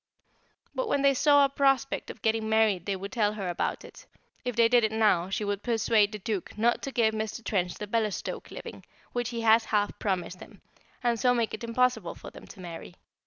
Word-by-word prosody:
But - - -2
when 280 - +1
they 275 0 +5
saw 285 +1 +5
a - - 0
prospect 275 -1 +1
of - - -10
getting 220 -1 +1
married 215 -5 +2
they 200 - 0
would 195 +1 -7
tell 210 -4 +1
her 200 -3 -4
about 175 - -2
it; - - -14 0.4
if 250 -2 -3
they 230 -1 +5
did 240 0 +4
it 220 - +1
now, 210 -5 +2
she 205 +2 -2
would 205 0 -2
persuade 225 -3 +2
the 210 - -5
Duke 205 -1 -4
not 235 +2 +2
to 275 - -5
give 225 -4 +2
Mr. 220 +1 -4
Trench 180 -4 -1
the 210 - -6
Bellestoke 215 -1 -2
living, - - -9 0.3
which 245 -1 -1
he 235 -2 -4
has 225 0 +5
half 205 -1 0
promised 185 -2 -2
him, - - -14 0.4
and 235 -2 +1
so 245 +1 +3
make 230 -3 0
it 220 - -6
impossible 250 +2 0
for - - -11
them - - -13
to 205 - -13
marry. 175 0 -9
220 Hz, 215 wpm, -28 LUFS, 205-240 Hz, 0.4 s, they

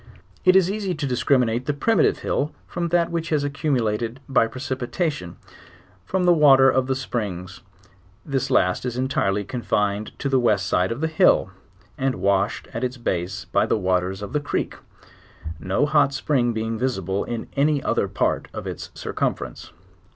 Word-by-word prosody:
It 185 0 +6
is 190 -1 +5
easy 200 -3 -2
to 145 - -3
discriminate 125 -2 +1
the 145 - 0
primitive 225 +10 +2
hill 150 +2 -1
from 170 0 -3
that 170 0 +1
which 170 0 -2
has 150 -3 +1
accumulated, 125 -5 -1
by 130 -4 +3
pre 130 +3 -9
sipitation, 130 - -3 0.7
from 190 -1 0
the 175 0 +6
water 135 -4 +6
of 130 0 +1
the 135 - 0
springs: 100 -8 -4 0.6
this 135 -2 -1
last 90 -8 +2
is 125 -1 -3
entire 130 -6 +1
ly 100 +1 -1
confined 105 -4 -2
to - - -3
the 135 -1 +3
west 105 -5 +2
side 90 +3 +1
of 120 +5 -4
the 160 - +1
hill, 160 0 +3 0.5
and 135 0 0
washed 100 +1 0
at 115 - -3
its 125 +1 -2
base 90 -6 -3
by - - +1
the - - +2
waters 95 0 0
of 100 - -7
the 150 - +2
creek, 145 - -2 0.9
no 95 +11 +1
hot 145 -2 +3
spring 130 -4 +1
being 110 0 -3
visible 100 -6 -1
in 115 -1 -4
any 145 0 +2
other - - +1
part - - -1
of - - -5
its - - -6
circumference. 60 -1 -3
130 Hz, 175 wpm, -23 LUFS, 105-145 Hz, 0.9 s, It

